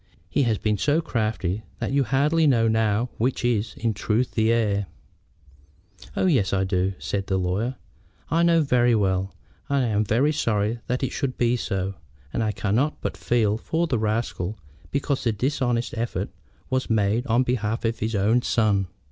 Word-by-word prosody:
He 145 - +2
has 110 - +1
been 105 0 0
so 150 +2 +2
crafty 110 - -1 0.2
that - - -3
you 140 0 +3
hardly 145 +6 +2
know 115 -5 +4
now 110 +1 +1
which 125 +1 0
is, 115 -2 0
in 115 -1 0
truth, 110 +5 0
the 110 0 +2
heir." 105 -4 +1 1.3
"Oh - - +2
yes, 130 - +2
I 95 -1 +2
do," 95 0 0
said 100 -1 -3
the 95 - +1
lawyer. 95 +8 -1 0.6
"I 165 - +3
know 170 -1 +4
very 120 -3 +3
well, 95 -2 0 0.3
and 140 -2 +2
am 105 -2 +1
very 120 +8 +2
sorry 115 -6 0
that 125 +2 -1
it 135 - 0
should 135 -3 -2
be 120 0 +2
so. 95 -5 -2 0.4
And 115 - 0
I 110 - +1
cannot 110 +9 0
but - - -3
feel 110 -3 +1
for 165 +7 0
the 130 -8 0
rascal 110 -3 -2 0.3
because 140 0 -1
the 120 - +2
dishonest 120 +1 -1
effort 115 0 -2 0.4
was 130 0 -1
made 110 +3 +1
on 120 +2 +3
behalf 115 -2 -1
of 115 0 -1
his 110 +1 -1
own 110 +5 +3
son." 105 -5 +1
115 Hz, 175 wpm, -24 LUFS, 105-130 Hz, 1.3 s, know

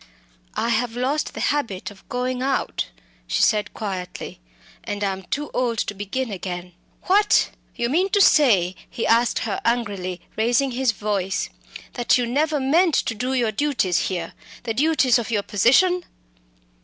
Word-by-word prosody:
"I 235 - 0
have 235 0 0
lost 275 +5 -1
the - - -5
habit 225 -11 -1
of 195 - -18
going 250 0 -2
out," 270 0 -1 0.4
she - - +1
said 210 -2 +2
quietly, 190 - -5 0.4
"and 205 0 -4
am 190 -1 -1
too 290 +10 -4
old 240 -2 0
to 205 - -1
begin 205 +5 -3
again." 180 -2 -5 0.3
"What! 410 +3 +3 0.2
you 235 - 0
mean 350 +10 +1
to 405 - +2
say," 220 - +5 0.2
he 235 - -3
asked 230 +1 +3
her 205 -3 -2
angrily, 200 -6 -1 0.2
raising 240 +4 +2
his 255 0 +1
voice, 205 -2 -2 0.4
"that 240 0 +2
you 250 - 0
have 235 - -3
never 300 +1 +1
meant 315 +5 +3
to - - +1
do 250 +4 -2
your 235 -4 +1
duties 210 -8 +1
here 175 -3 -4 0.3
the 230 -2 -2
duties 265 -3 +3
of 230 - -4
your 210 -3 0
position?" 350 - +3
235 Hz, 160 wpm, -23 LUFS, 200-270 Hz, 0.4 s, say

